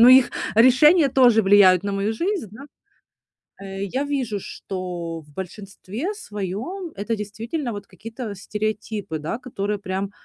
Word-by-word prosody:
ну 235 - +9
их 255 0 +8 0.2
решения 275 +7 +6
тоже 245 -4 +5
влияют 195 -2 +6
на 200 - -1
мою 200 +2 0
жизнь, 345 - -2
да. 250 +7 -11 1.0
Э, 195 0 -5
я 260 +8 -1
вижу, 260 -8 -2
что 175 -4 -5
в 150 - -21
большинстве 200 - -6
своём 245 - -5
это 210 +3 -2
действительно 225 +6 -4
вот 205 -1 -6
какие-то 225 +3 -7
стереотипы, 210 -3 -3
да, 155 +9 -3
которые 210 -5 -3
прям 195 0 -3
210 Hz, 140 wpm, -23 LUFS, 195-255 Hz, 1.0 s, ну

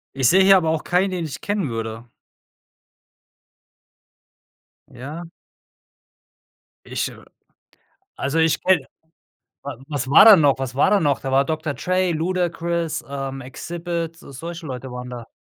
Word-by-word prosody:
Ich 130 -3 +3
sehe 190 +1 +5
hier 195 0 +7
aber 165 -3 0
auch 160 -1 -1
keinen, 185 +2 +1
den 175 -3 -3
ich 150 - -7
kennen 200 -7 -2
würde. 115 0 -5 2.8
Ja? 145 +7 -8 1.6
Ich, - - -2
äh - - -14 0.9
also 140 +4 -1
ich 160 -1 +2
kenne 180 -7 +2 0.8
wa - - -6
was 135 -4 -3
war 155 - +8
da 220 -3 +11
noch 145 -5 +3
was 130 -2 -4
war 140 - +3
da 205 - +4
noch? 145 -5 +1
Da 135 - -5
war 135 +1 +3
Dr. 155 -1 -2
Dre, 185 0 0
Ludacris, 170 -1 -1
ähm, 135 -1 -5
Xzibit, 170 +1 -5
so 140 - -14
solche 165 +4 -7
Leute 130 -1 -6
waren 125 0 -7
da. 120 -2 -8
160 Hz, 145 wpm, -22 LUFS, 135-175 Hz, 2.8 s, da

